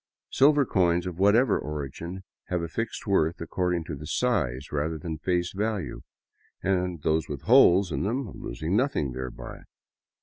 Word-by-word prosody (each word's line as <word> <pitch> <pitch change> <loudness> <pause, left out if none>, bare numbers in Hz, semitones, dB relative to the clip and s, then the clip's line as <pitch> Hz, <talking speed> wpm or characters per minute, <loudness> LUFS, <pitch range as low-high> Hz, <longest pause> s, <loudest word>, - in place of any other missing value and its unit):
Silver 145 +1 +5
coins 90 -4 +2
of 90 -1 -5
whatever 105 +4 +4
origin 75 +5 -6 0.2
have 90 -2 -2
a - - -2
fixed 115 +7 -4
worth, 85 -5 +1
according 90 0 -1
to 75 -2 -7
size 65 -2 -1
rather 75 +2 -1
than 80 0 -5
face 90 0 -1
value, 105 -4 -2 0.6
those 90 -4 0
with 70 -1 -5
holes 100 - +6
in - - -1
them 115 +3 -2
losing 80 +10 -3
nothing 120 - +1
thereby. 65 0 -7
90 Hz, 140 wpm, -27 LUFS, 80-100 Hz, 0.6 s, holes